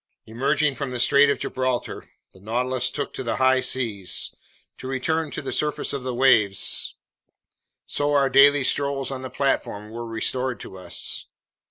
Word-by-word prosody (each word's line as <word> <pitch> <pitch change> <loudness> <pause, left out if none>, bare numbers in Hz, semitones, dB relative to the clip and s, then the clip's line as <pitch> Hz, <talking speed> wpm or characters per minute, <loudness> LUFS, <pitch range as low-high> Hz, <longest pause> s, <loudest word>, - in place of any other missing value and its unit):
Emerging 140 +6 +1
from 140 0 -4
the 125 -1 -4
Strait 140 +3 +5
of 140 - +1
Gibraltar, 130 -1 -3 0.2
the 95 - -18
Nautilus 125 +4 -1
took 145 - -4
to - - -5
the 115 - -2
high 130 0 +3
seas. 115 -7 -2 0.4
It 130 - -9
returned 150 +4 -1
to - - -3
the - - -4
surface 150 -1 0
of 140 - -3
the 125 -1 -4
waves, 110 -7 +3 0.9
so 145 0 -1
our 140 -1 +4
daily 140 +1 +6
strolls 140 0 +1
on 130 -1 -5
the 130 - -6
platform 110 -7 -2
were 115 +1 -6
restored 125 +1 -2
to - - -9
us. 90 - -3
130 Hz, 165 wpm, -24 LUFS, 120-140 Hz, 0.9 s, daily